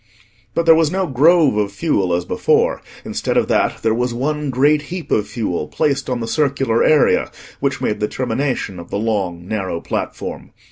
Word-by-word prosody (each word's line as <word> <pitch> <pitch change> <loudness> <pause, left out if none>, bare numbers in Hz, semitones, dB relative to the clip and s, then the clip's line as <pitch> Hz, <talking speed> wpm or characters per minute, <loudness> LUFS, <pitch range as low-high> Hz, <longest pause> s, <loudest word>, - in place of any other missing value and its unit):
But 170 - +1
there 165 - +8
was 160 -1 +3
no 190 0 0
grove 150 -2 +4
of 105 -1 0
fuel 100 - 0
as 85 0 -2
before: - - +1 0.2
instead - - -2
of - - +2
that, - - +1
there 110 - +2
was 120 +1 -1
one 150 +3 -2
great 145 +4 +3
heap 180 -1 -6
of 105 - +1
fuel 90 -10 -3
placed 140 - -1
on 125 -2 -2
the 115 - -3
circular 135 -5 +1
area 155 -2 +3 0.3
which - - -1
made 105 - -1
the 105 - 0
termination 125 -6 -2
of 85 - -10
the - - -2
long 95 -5 -2
narrow 95 -5 -2
platform. - - -5
125 Hz, 185 wpm, -19 LUFS, 105-150 Hz, 0.3 s, there